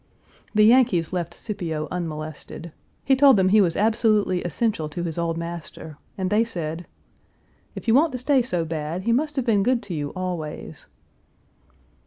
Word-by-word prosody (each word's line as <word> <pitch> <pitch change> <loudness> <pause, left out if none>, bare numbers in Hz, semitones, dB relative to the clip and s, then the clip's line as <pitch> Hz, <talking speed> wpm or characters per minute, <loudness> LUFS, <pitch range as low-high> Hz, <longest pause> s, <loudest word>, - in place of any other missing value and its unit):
The 215 - +6
Yankees 220 -9 +4
left 175 -2 -2
Scipio 165 -8 -4
unmolested. 160 -1 -6 0.3
He 270 - +4
told 270 -3 +6
them 185 -1 +3
he 210 +2 +5
was 170 -4 +1
absolutely 215 -4 +2
essential 175 -2 -1
to 170 +3 -5
his 170 -1 -3
old 165 -1 -1
master, 170 -2 -7 0.2
and 190 0 -2
they 215 +2 +4
said, 170 -6 -5 0.9
"If - - -8
you 225 - +4
want 300 +5 +4
to - - -2
stay 260 +1 +2
so 180 -9 -2
bad, 160 +2 -4
he 230 - +1
must 295 +5 0
have 265 -3 -1
been 215 -5 +3
good 245 +3 +1
to 200 -3 -6
you 145 -2 -3
always." 180 -5 -5
185 Hz, 170 wpm, -24 LUFS, 165-230 Hz, 0.9 s, The